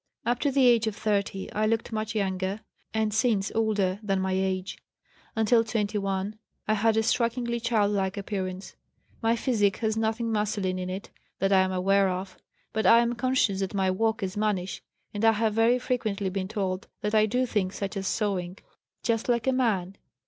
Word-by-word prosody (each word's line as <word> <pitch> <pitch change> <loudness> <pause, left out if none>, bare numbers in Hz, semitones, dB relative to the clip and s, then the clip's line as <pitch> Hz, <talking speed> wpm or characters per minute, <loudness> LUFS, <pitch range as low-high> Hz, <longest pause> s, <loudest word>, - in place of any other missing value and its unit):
Up 240 +1 +1
to 290 - +1
the 270 -1 +3
age 235 -2 +5
of 215 - -2
30 200 -3 -1
I 215 +1 +1
looked 225 +1 -1
much 215 0 -3
younger, 190 0 -1 0.3
and 220 -1 0
since 220 -3 +1
older, 205 -4 +1
than 195 -3 0
my 190 0 -1
age. 190 0 -2 0.6
Until 220 +1 +4
21 205 -2 -2 0.3
I 215 - +3
had 220 +1 +2
a 220 - +3
strikingly 235 +1 0
child 225 -3 +1
like 195 0 -1
appearance. 190 -2 -4 0.5
My 230 0 +2
physique 215 -5 +1
has 220 -1 0
nothing 225 +1 -1
masculine 205 -3 -1
in 180 0 -4
it 190 +2 -6 0.3
that 195 0 +1
I 190 - +6
am 190 0 +1
aware 195 +1 +3
of; 185 +1 -4 0.4
but 220 -3 +1
I 230 - +8
am 235 0 0
conscious 240 -5 +1
that 195 +1 -3
my 190 -1 +2
walk 220 +2 0
is 190 +1 -3
mannish, 205 -3 -1 0.3
and 205 +1 -3
I 225 0 +6
have 220 0 +1
very 225 +3 +4
frequently 215 -6 -2
been 190 0 -2
told 190 -2 -3
that 210 +1 -2
I 215 0 +4
do 250 +4 +1
things 200 -5 -1
such 200 -1 -4
as 195 -1 -3
sewing, 190 -4 -1 0.5
'just 230 +1 0
like 235 -2 +2
a 265 - +2
man.' 200 -7 0
210 Hz, 190 wpm, -27 LUFS, 195-225 Hz, 0.6 s, I